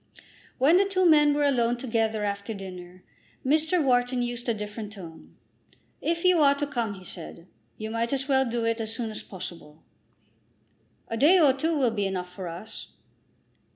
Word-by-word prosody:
When 295 +7 +5
the 395 - +4
two 375 -1 +1
men 295 -2 +6
were 295 - +1
alone 245 -4 +2
together 225 -3 -1
after 200 +2 -3
dinner, 180 -2 -10 0.4
Mr. 315 +4 +2
Wharton 245 -1 +2
used 240 0 -4
a - - +3
different 210 0 -6
tone. 170 -6 -12 0.7
"If 335 +2 -1
you 360 -3 +5
are 280 -1 +5
to 290 +1 -2
come," 235 -8 -3
he 185 - -12
said, 170 -1 -9 0.3
"you 220 0 -5
might 230 +1 -1
as 275 0 -1
well 265 -3 +2
do 230 0 -1
it 230 0 0
as 220 0 -3
soon 225 -2 -3
as 215 - -5
possible." 170 -5 -9 1.2
"A 230 - -4
day 310 +10 +6
or 295 -6 +5
two 315 +4 -1
will 255 -5 +2
be 205 -3 -1
enough 180 -2 -4
for 185 -1 -6
us." 175 +6 -8
235 Hz, 180 wpm, -26 LUFS, 205-280 Hz, 1.2 s, men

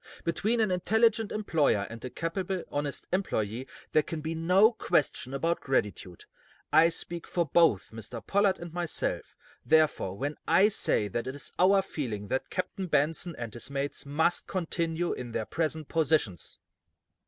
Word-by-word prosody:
Between 215 +7 0
an 215 -3 +2
intelligent 220 +4 +2
employer 155 - +1
and 115 0 -10
a 130 - -4
capable, 180 +4 -3
honest 145 -1 -2
employe 120 - -1 0.2
there 155 - +4
can 160 +1 -5
be 160 +2 -3
no 180 +7 +4
question 145 - 0
about 165 +5 0
gratitude. 105 -8 -2 0.5
I 160 +2 +7
speak 170 0 -5
for 170 -1 0
both 160 - +3
Mr. 115 +1 -8
Pollard 200 -1 +2
and 170 -1 -9
myself, 175 -2 -2 0.3
therefore, 155 -12 +2
when 145 +5 -3
I 190 +6 +5
say 105 - +1
that 120 +5 -3
it 130 - -4
is 145 - 0
our 195 +1 +5
feeling 110 - -5
that 130 - -2
Captain 185 +1 -3
Benson 165 +2 0
and 115 -3 -6
his 120 +3 -6
mates 140 0 -3
must 160 +5 +1
continue 170 -1 -1
in 120 -2 -7
their 110 - -2
present 155 0 -2
positions." 155 - 0
160 Hz, 155 wpm, -29 LUFS, 130-180 Hz, 0.5 s, I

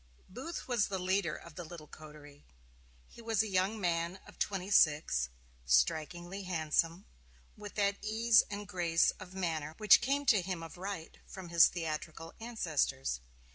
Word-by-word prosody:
Booth 265 - -7
was 240 -5 +2
the 195 - -3
leader 185 -2 0
of 170 - -11
the 175 - -7
little 165 -1 -10
coterie. 150 -2 -13 0.6
He - - -14
was 225 -2 +1
a - - -4
young 195 +3 0
man 170 -1 0
of - - -16
twenty 195 0 -2
six, 145 - +3 0.3
strikingly 155 - +1
handsome, 165 0 0 0.5
with 205 -1 -10
that 200 -1 +1
ease 220 +1 +5
and 205 0 -6
grace 170 -2 +2
of 185 +1 -11
manner 160 -4 -2
which 210 -2 +7
came 280 +3 0
to 215 -7 +5
him 180 -2 -4
of 165 - -9
right 185 -2 -6
from 190 -3 -9
his 170 -1 +7
theatrical 165 -1 -5
ancestors. 155 - -1
180 Hz, 155 wpm, -33 LUFS, 160-205 Hz, 0.6 s, which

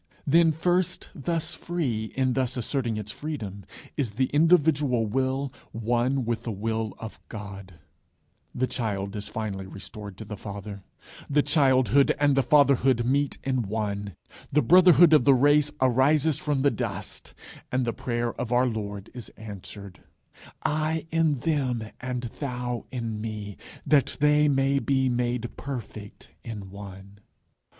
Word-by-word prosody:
Then 165 +3 +5
first, 175 +3 0
thus 165 +3 -2
free, 150 -11 -2
in 130 -1 +1
thus 130 -1 -1
asserting 120 -2 -1
its 105 -1 -5
freedom, 115 - -6 0.3
is 120 -7 -2
the 130 +4 0
individual 150 -6 +3
will 130 +4 -1 0.2
one 120 +3 0
with 115 0 -1
the 115 - -4
Will 110 0 -2
of 110 -1 -8
God; 100 -4 -8 0.8
the 130 - 0
child 100 -5 -3
is 105 -1 -4
finally 100 -4 -4
restored 100 0 -9
to 110 - -8
the 105 +1 -6
father; 100 0 -7 0.5
the 145 0 +3
childhood 140 -2 +3
and 145 -1 +4
the 135 - +4
fatherhood 135 -2 +4
meet 140 +3 +1
in 130 -2 0
one; 100 -3 -3 0.4
the 150 +2 +3
brotherhood 175 -2 +7
of 150 - +6
the 140 0 +6
race 145 +3 +4
arises 135 +4 +3
from 145 -3 -1
the 140 - +4
dust; 105 -4 -5 0.4
and 130 0 +1
the 115 - -1
prayer 120 -1 -2
of 125 -1 -4
our 125 +1 +4
Lord 105 -4 -4
is 125 -2 -8
answered, 100 -2 -9 0.6
"I 155 +1 0
in 160 -5 +2
them 125 -8 -1
and 125 0 -4 0.2
thou 125 -3 -3
in 115 -4 -4
me, 105 -2 -5 0.3
that 145 -4 +2
they 150 0 +4
may 135 0 +2
be 130 -1 +1
made 120 -1 -1
perfect 115 -6 -7
in 105 -4 -7
one." 100 0 -11
125 Hz, 145 wpm, -26 LUFS, 110-140 Hz, 0.8 s, brotherhood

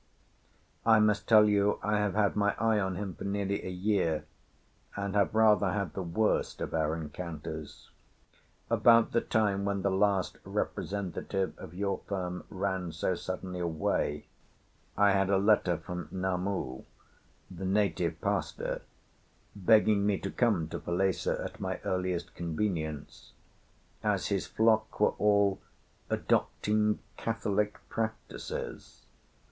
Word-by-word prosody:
I 110 -1 +6
must 105 -1 +2
tell 105 -2 +8
you 105 0 +2
I 105 0 +1
have 105 -2 0
had 105 -2 +2
my 105 -1 +2
eye 110 -1 +2
on 95 -2 -1
him 95 0 -4
for - - -9
nearly 100 0 -1
a - - -4
year, 90 -5 0 0.7
and 100 -1 -3
have 100 0 +2
rather 105 -4 +4
had 100 -5 -2
the 95 - -3
worst 95 +5 0
of - - -4
our 80 -1 +1
encounters. 80 -1 -7 0.8
About 115 -1 +5
the 115 - +2
time 100 -3 +1
when 100 -1 -1
the 100 - +2
last 95 -1 +1
representative 95 0 -2
of 85 - -10
your 100 +1 -1
firm 90 -2 -3
ran 95 -3 -2
so 85 +3 -1
suddenly 90 +1 -5
away, 80 -3 -1 0.7
I 100 0 +5
had 95 0 +2
a 100 - +4
letter 100 -4 +3
from 90 0 -6
Namu, 95 -7 -2 0.7
the 95 +1 -6
native 90 -4 +1
pastor, - - -2 0.7
begging 105 +1 +4
me 100 -1 +2
to 95 - -3
come 105 -10 +1
to - - -4
Falesá 95 +2 0
at - - -8
my - - -3
earliest 90 -1 -2
convenience, 80 -3 -3 0.7
as - - 0
his - - -1
flock 110 0 +2
were - - +4
all 100 -2 +3 0.5
'adopting 105 0 +1 0.2
Catholic 105 -2 -1
practices. 110 -1 -5
100 Hz, 130 wpm, -30 LUFS, 90-105 Hz, 0.8 s, tell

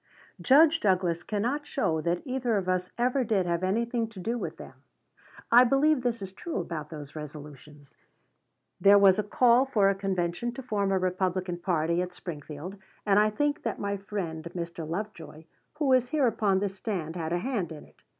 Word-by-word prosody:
Judge 315 +4 +5
Douglas 185 - +1
cannot 245 +10 -2
show 160 - 0
that 170 +2 -1
either 255 -4 0
of 190 -2 -3
us 180 0 0
ever 250 +2 +1
did 205 -5 +1
have 170 0 -1
anything 230 +4 0
to 220 -3 -12
do 230 +6 -2
with 240 - -5
them. - - -10 0.8
I 240 +2 +8
believe 275 +3 +3
this 235 -4 -2
is 190 - -7
true 330 - -6
about 155 -3 -5
those 150 -2 -9
resolutions: 150 -1 -11 0.8
There 200 +1 +7
was 200 0 +6
a - - +1
call 240 +4 +4
for 215 -7 +2
a - - +3
convention 195 +3 -2
to 265 - -8
form 205 -5 -1
a 190 - +2
Republican 185 -1 -1
party 170 -1 0
at 180 0 -5
Springfield; 160 +3 -8 0.3
and 205 -1 +4
I 215 0 +4
think 290 +7 -1
that 225 - -3
my 200 0 -2
friend, 195 -6 -5
Mr. 170 -2 -5
Lovejoy, 175 -4 -6 0.3
who 290 -3 +2
is 250 -1 +3
here 295 -2 +2
upon 215 -4 +2
this 195 0 -1
stand, 180 -6 -4
had 165 -2 -3
a 175 - +1
hand 200 -5 -2
in 155 -2 -9
it. - - -25
195 Hz, 190 wpm, -28 LUFS, 170-235 Hz, 0.8 s, I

